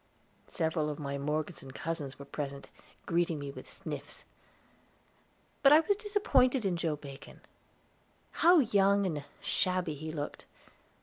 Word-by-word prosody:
Several 160 Hz, -3 st, 0 dB
of 150 Hz, -, -4 dB
my 140 Hz, -1 st, -4 dB
Morgeson 150 Hz, 0 st, -2 dB
cousins 145 Hz, 0 st, -4 dB
were 140 Hz, -, -9 dB
present, 140 Hz, -1 st, -5 dB, 0.4 s
greeting 170 Hz, -2 st, +1 dB
me 140 Hz, -1 st, -5 dB
with -, -, -11 dB
sniffs. -, -, -6 dB, 1.4 s
But 275 Hz, -, +7 dB
I 305 Hz, +2 st, +9 dB
was 405 Hz, +5 st, +2 dB
disappointed 390 Hz, -, +2 dB
in 185 Hz, -2 st, +1 dB
Joe 165 Hz, -2 st, -1 dB
Bacon; 140 Hz, -2 st, -11 dB, 0.9 s
how 350 Hz, +1 st, +6 dB
young 200 Hz, -6 st, +4 dB
and 155 Hz, -6 st, -2 dB, 0.2 s
shabby 180 Hz, -3 st, +1 dB
he 155 Hz, +2 st, -6 dB
looked! 150 Hz, -2 st, -5 dB
165 Hz, 130 wpm, -31 LUFS, 145-200 Hz, 1.4 s, I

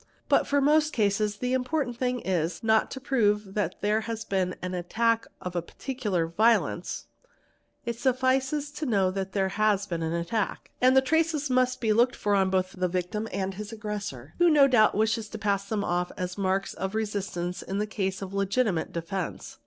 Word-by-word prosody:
But -, -, +2 dB
in 285 Hz, -1 st, +3 dB
most 305 Hz, +2 st, +3 dB
cases 210 Hz, -2 st, +1 dB
the 250 Hz, +3 st, -1 dB
important 260 Hz, 0 st, -1 dB
thing 250 Hz, 0 st, -1 dB
is, 170 Hz, -1 st, -1 dB
not 220 Hz, 0 st, +3 dB
to 265 Hz, -, -6 dB
prove 210 Hz, -7 st, +1 dB
that 195 Hz, -4 st, -1 dB
there 210 Hz, +2 st, +2 dB
has 225 Hz, 0 st, -5 dB
been 185 Hz, -2 st, -1 dB
an 185 Hz, 0 st, -4 dB
attack 225 Hz, +6 st, 0 dB
of 180 Hz, -1 st, -6 dB
a 175 Hz, -, +1 dB
particular 205 Hz, -3 st, -2 dB
violence; 220 Hz, +8 st, +1 dB, 0.8 s
it 235 Hz, -1 st, -3 dB
suffices 265 Hz, +3 st, +1 dB
to 295 Hz, +1 st, -4 dB
know 195 Hz, -5 st, +2 dB
that 195 Hz, 0 st, -4 dB
there 195 Hz, -1 st, +1 dB
has 205 Hz, 0 st, +1 dB
been 170 Hz, -4 st, -3 dB
an 160 Hz, 0 st, -1 dB
attack; 190 Hz, +5 st, -2 dB
and 255 Hz, +1 st, +5 dB
the -, -, +8 dB
traces 315 Hz, -1 st, +1 dB
must 255 Hz, 0 st, +2 dB
be 220 Hz, -2 st, +3 dB
looked 240 Hz, +3 st, +3 dB
for 205 Hz, -, 0 dB
both 185 Hz, 0 st, 0 dB
on 185 Hz, -, -13 dB
the 180 Hz, -, +3 dB
victim 185 Hz, +5 st, -2 dB
and 195 Hz, 0 st, -2 dB
on -, -, -14 dB
his 210 Hz, +1 st, -6 dB
aggressor, 205 Hz, -, -6 dB
who 350 Hz, 0 st, +6 dB
no 290 Hz, -3 st, +6 dB
doubt 230 Hz, -5 st, +4 dB
wishes 220 Hz, +1 st, +1 dB
to -, -, -6 dB
pass 200 Hz, -1 st, -1 dB
them 210 Hz, -2 st, -1 dB
off 175 Hz, -1 st, -1 dB
as 180 Hz, -1 st, -3 dB
marks 195 Hz, 0 st, -1 dB
of 190 Hz, +2 st, -4 dB
resistance 195 Hz, -5 st, -3 dB
in 195 Hz, +1 st, -3 dB
a 210 Hz, -, +1 dB
case 195 Hz, -2 st, -3 dB
of 190 Hz, 0 st, -7 dB
legitimate 200 Hz, -2 st, 0 dB
defence. 170 Hz, +2 st, -5 dB
210 Hz, 195 wpm, -27 LUFS, 190-250 Hz, 0.8 s, the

